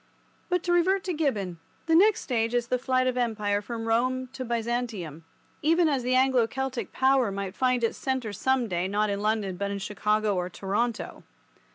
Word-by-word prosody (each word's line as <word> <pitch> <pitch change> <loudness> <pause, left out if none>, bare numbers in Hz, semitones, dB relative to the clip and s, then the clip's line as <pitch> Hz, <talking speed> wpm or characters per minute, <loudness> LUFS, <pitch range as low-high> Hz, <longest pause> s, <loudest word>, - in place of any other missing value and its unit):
But 360 -1 +1
to 350 - 0
revert 370 +3 +3
to 370 -3 -2
Gibbon: 210 - -1 0.3
the 325 - +1
next 405 +6 +5
stage 230 -2 -1
is 240 0 0
the 250 - +1
flight 255 0 +1
of 255 -1 0
Empire 210 -4 0
from 225 +1 -5
Rome 255 +3 0
to 260 -1 -5
Byzantium, 230 - -3 0.4
even 330 +2 +3
as 280 -4 +1
the 250 +1 +1
Anglo 255 -3 +4
Celtic 265 0 -4
power 265 -4 +3
might 195 -1 -4
find 250 0 +1
its 230 - 0
centre 260 -5 -2
some 260 +3 +1
day 175 -2 -1
not 205 +1 0
in 200 0 -2
London 210 -3 0
but 200 +1 -2
in 200 - -3
Chicago 210 +1 0
or 180 0 -2
Toronto. 210 +6 -2
235 Hz, 190 wpm, -27 LUFS, 205-260 Hz, 0.4 s, next